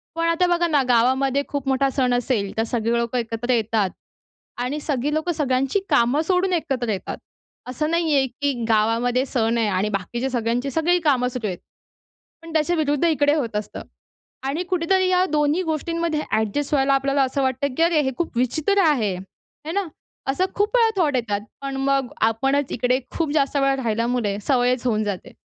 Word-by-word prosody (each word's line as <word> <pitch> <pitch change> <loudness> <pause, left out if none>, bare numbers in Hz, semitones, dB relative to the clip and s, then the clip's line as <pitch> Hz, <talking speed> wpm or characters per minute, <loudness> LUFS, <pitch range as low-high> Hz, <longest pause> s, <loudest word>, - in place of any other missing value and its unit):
पण 330 0 0
आता 335 +2 +2
बघा 345 0 +2
ना, 295 -4 +3
गावामध्ये 260 +3 +3
खूप 280 -2 -4
मोठा 270 +1 +2
सण 255 -2 +1
असेल. 235 -5 0
तर 225 - +2
सगळी 230 0 -1
लोकं 235 +1 -1
एकत्र 230 +1 -2
येतात 220 -3 +1 0.7
आणि 270 +5 -2
सगळी 285 0 -1
लोकं 315 +3 0
सगळ्यांची 270 +3 0
कामं 285 0 +3
सोडून 370 0 +2
एकत्र 270 -8 -1
येतात. 195 - -4 0.5
असं 305 +5 -2
नाहीये, 315 -5 +2
की 285 +4 -2 0.2
गावामध्ये 230 +4 +2
सण 230 -3 0
आहे 225 -2 +1
आणि 200 +1 0
बाकीच्या 215 +6 -3
सगळ्यांची 245 +2 -1
सगळी 345 +4 +2
कामं 265 -6 +2
सुरू 245 -3 -4
आहेत. 180 -3 -4 0.8
पण 330 -1 -10
त्याच्याविरुद्ध 310 -1 +1
इकडे 295 -3 +3
होत 235 -8 -2
असतं 210 - -4 0.7
आणि 300 +6 -1
कुठेतरी 370 +1 +2
या 365 0 +3
दोन्ही 300 +3 +2
गोष्टींमध्ये, 325 0 -1
ॲडजस्ट 220 +8 -1
व्हायला 275 -1 +3
आपल्याला 275 0 +2
असं 265 +1 -1
वाटतं, 260 +1 -1
की 330 - +3
अरे, 335 -3 +3
हे 265 -2 -1
खूप 330 -8 -3
विचित्र 310 - +1
आहे, 225 -10 +2 0.5
है 320 - -3
ना? 395 -2 -1 0.4
असं 365 +7 +1
खूप 420 +4 0
वेळा 455 -1 +5
थॉट 290 -5 +1
येतात. 210 -4 -1 0.2
पण 275 -1 -4
मग 275 -2 +2 0.2
आपणच 270 +5 0
इकडे 250 +1 +1 0.2
खूप 320 -3 0
जास्त 285 -1 +1
वेळा 275 -1 +2
राहिल्यामुळे, 230 -2 0
सवयच 250 -2 +2
होऊन 215 -2 +1
जाते. 200 -3 -5
270 Hz, 175 wpm, -22 LUFS, 235-310 Hz, 0.8 s, वेळा